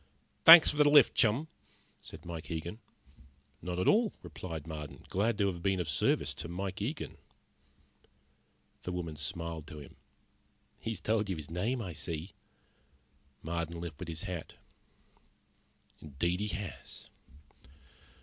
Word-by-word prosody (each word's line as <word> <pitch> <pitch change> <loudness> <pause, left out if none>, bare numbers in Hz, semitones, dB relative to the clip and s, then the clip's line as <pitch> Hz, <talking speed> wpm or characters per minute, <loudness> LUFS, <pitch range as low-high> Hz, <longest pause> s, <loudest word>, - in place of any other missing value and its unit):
"Thanks 165 -1 +11
for 150 - -6
the 150 -1 +6
lift, 145 -4 +7
chum," 120 +8 +2 0.5
said 80 +2 -12
Mike 85 -2 -7
Eagen. 85 +5 -4 0.8
"Not 90 +1 -4
at 90 - 0
all," 220 0 +4
replied 80 -1 -7
Marden. 75 -3 -8
"Glad 110 +5 +1
to 100 - +2
have 90 -3 -2
been 95 0 +1
of 85 - -2
service 75 -2 +1
to - - -5
Mike 95 +3 -4
Eagen." 140 +9 -4 1.6
The 90 - -4
woman 85 -3 -4
smiled 80 +2 -3
to 75 - -9
him. 70 -2 -12 0.8
"He's 115 -4 -4
told 110 -2 +1
you 95 - 0
his 75 -1 -8
name, 115 +8 -1
I 90 -4 -5
see." 80 +3 -5 1.1
Marden 85 0 -3
lifted 85 0 -6
his 80 0 -4
hat. 90 -4 -6 1.5
"Indeed 85 +5 -1
he 105 - -1
has." 100 -3 -6
90 Hz, 135 wpm, -32 LUFS, 80-105 Hz, 1.6 s, Thanks